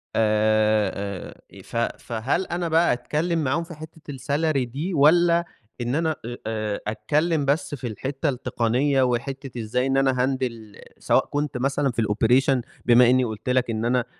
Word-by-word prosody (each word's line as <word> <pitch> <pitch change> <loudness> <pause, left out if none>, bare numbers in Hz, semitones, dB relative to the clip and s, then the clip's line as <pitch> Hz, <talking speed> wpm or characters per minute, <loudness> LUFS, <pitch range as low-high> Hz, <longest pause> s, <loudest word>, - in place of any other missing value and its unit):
آآ 110 -1 +2
آآ، 100 -2 -8
ف - - -13 0.3
فهل 125 +10 -1
أنا 175 -1 -2
بقى 165 -1 +3
أتكلم 155 +6 -1
معاهُم 145 +6 0
في 170 0 -10
حتّة 155 -1 -10
الsalary 140 -2 0
دي؟ 155 +9 -4
والَّا 170 +3 +4 0.4
إن 120 +2 -1
أنا 160 0 0
آآ 120 +1 -6
آآ، 110 -2 -3
أتكلم 150 +7 0
بس 145 +1 0
في 130 -3 -6
الحتّة 135 +7 -3
التقنيّة 130 +2 0
وحتّة 130 +1 -3
إزاي 125 +4 -1
إن 135 0 +1
أنا 135 -1 +3
أهندل 120 -5 -3 0.2
سواء - - +2
كنت 145 -3 -3
مثلًا 135 +1 0
في 115 - -1
الoperation 120 +5 +2 0.2
بما 120 0 +6
إني 130 0 +4
قُلت 110 +1 -5
لك 125 -1 +1
إن 110 0 -2
أنا 125 0 +1
130 Hz, 160 wpm, -24 LUFS, 115-150 Hz, 0.4 s, بما